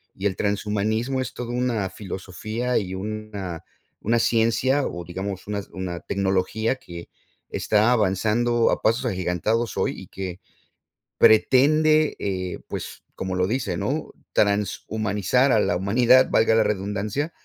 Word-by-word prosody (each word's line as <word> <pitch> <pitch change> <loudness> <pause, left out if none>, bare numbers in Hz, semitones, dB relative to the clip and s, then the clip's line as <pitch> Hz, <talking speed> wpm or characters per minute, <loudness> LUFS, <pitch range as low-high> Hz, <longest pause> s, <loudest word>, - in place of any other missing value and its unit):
Y 95 - -6
el 95 -2 +1
transhumanismo 110 +5 -1
es 130 - -5
todo 120 -1 -5
una 120 -6 -1
filosofía 110 +6 -4
y 95 -2 -5
una 100 -4 -5 0.4
una 115 +3 +2
ciencia 120 +5 +2
o 90 0 -6
digamos 95 +2 -5
una 105 -1 -2
una 90 -2 -4
tecnología 100 +4 0
que, 85 -7 -10 0.4
está 110 +2 +2
avanzando 115 +3 +2
a - - -1
pasos 115 +2 +1
agigantados 95 +5 -1
hoy - - +1
y - - -11
que 95 -1 -6 0.8
pretende, 155 +7 +5
eh, 95 -2 -3
pues, - - -7
como 95 -1 -4
lo 90 0 +2
dice, 125 +4 -1
¿no? - - -2 0.2
Transhumanizar 105 +4 +1
a 110 - +4
la 90 - +1
humanidad, 120 +7 +4
valga 110 0 +4
la 110 - +5
redundancia, 105 - -2
105 Hz, 135 wpm, -24 LUFS, 95-120 Hz, 0.8 s, pretende